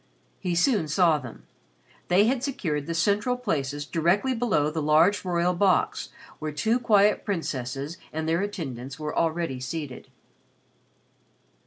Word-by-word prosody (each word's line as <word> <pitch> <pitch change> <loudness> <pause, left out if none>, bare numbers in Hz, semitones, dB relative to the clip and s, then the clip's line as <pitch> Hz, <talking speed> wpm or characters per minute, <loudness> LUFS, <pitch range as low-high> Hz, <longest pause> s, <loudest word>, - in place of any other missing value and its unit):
He 180 -2 -2
soon 190 - +2
saw 160 0 +3
them. 125 -4 -10 0.6
They 185 +4 +4
had 250 +2 +1
secured 165 - -2
the 165 - -2
central 205 +8 +1
places 145 - -2
directly 175 - +1
below 220 -11 +1
the 160 0 -2
large 160 +7 +4
royal 175 -1 +1
box 185 +1 +1 0.3
where 155 0 -3
two 220 +11 +1
quiet 210 -3 +3
princesses 145 - -3
and 160 0 -3
their 165 +2 +1
attendants 135 - -5
were 150 0 -4
already 165 -5 0
seated. 130 0 -6
170 Hz, 135 wpm, -26 LUFS, 150-205 Hz, 0.6 s, They